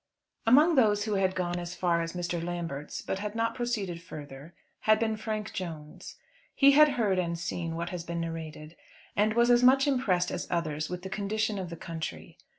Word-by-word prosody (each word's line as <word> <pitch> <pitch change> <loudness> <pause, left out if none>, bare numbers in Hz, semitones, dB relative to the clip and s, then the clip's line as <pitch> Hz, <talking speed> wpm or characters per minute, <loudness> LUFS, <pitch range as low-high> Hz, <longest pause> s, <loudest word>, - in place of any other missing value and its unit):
Among 300 +8 +6
those 210 -7 +4
who 215 -1 -2
had 190 -1 +1
gone 175 -1 -1
as 175 +1 -6
far 170 -2 +1
as 165 0 -4
Mr. 175 -1 -3
Lambert's, 170 -5 -4
but 190 - -3
had 210 +1 -4
not 230 0 0
proceeded 215 -9 -3
further, 150 -2 -10 0.2
had 215 0 +4
been 220 0 0
Frank 215 -1 -4
Jones. 160 -5 -7 0.4
He 280 0 +7
had 300 0 +6
heard 200 -5 +2
and 170 -1 -1
seen 165 -1 -3
what 170 +1 -3
has 180 -2 -4
been 170 0 -4
narrated, 160 -1 -6 0.4
and 215 +1 +2
was 235 +1 +4
as 240 0 +5
much 265 +2 +6
impressed 210 -11 +1
as - - -4
others 155 -3 -2
with 180 0 -5
the 190 - -5
condition 215 +1 -1
of 185 -2 -5
the 170 - -7
country. 160 - -7
180 Hz, 195 wpm, -29 LUFS, 170-220 Hz, 0.4 s, He